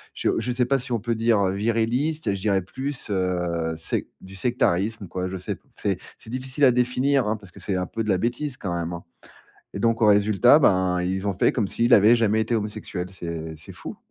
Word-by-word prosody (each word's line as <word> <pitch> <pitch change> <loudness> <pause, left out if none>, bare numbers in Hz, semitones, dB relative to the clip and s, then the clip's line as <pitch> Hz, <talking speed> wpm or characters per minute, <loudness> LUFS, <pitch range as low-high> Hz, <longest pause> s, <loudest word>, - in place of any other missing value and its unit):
je - - +1
je 125 - -2
sais 125 0 +1
pas 135 +2 +1
si 125 +1 -7
on 115 - +1
peut 115 +2 -1
dire, 115 -1 +2
heu, 95 - +1
viriliste, 115 +6 0
je 95 - -5
dirais 100 -2 +1
plus, 130 +5 -5
heu, 90 -3 -1
sec 80 - -3
du 95 +1 -12
sectarisme, 105 -2 0
quoi, 90 +1 -3
je 95 +1 -5
sais 90 - -4
p - - -24 0.2
c'est - - -1 0.2
c'est 110 - -12
difficile 130 +2 0
à 125 - +7
définir, 125 +1 +1
hein, 110 +1 0
parce 100 -3 -14
que - - -14
c'est 95 - -2
un 90 - -1
peu 115 +4 -4
de 105 - -4
la 95 - +3
bêtise 125 +6 -2
quand 90 -3 -4
même, 85 0 -3
hein. 85 - -7 0.7
Et 100 - -5
donc 115 +1 +2
au - - +6
résultat, 105 +7 +5
ben, 95 -7 +3
ils 95 +2 -2
ont 100 - 0
fait 90 - +2
comme 110 -5 -1
s'il 120 +5 0
avait 110 +3 +6
jamais 110 -1 +2
été 115 - -2
homosexuel, 105 -4 -4
c'est 85 -3 -6
c'est 80 - -11
fou. - - -8
105 Hz, 235 wpm, -24 LUFS, 95-120 Hz, 0.7 s, à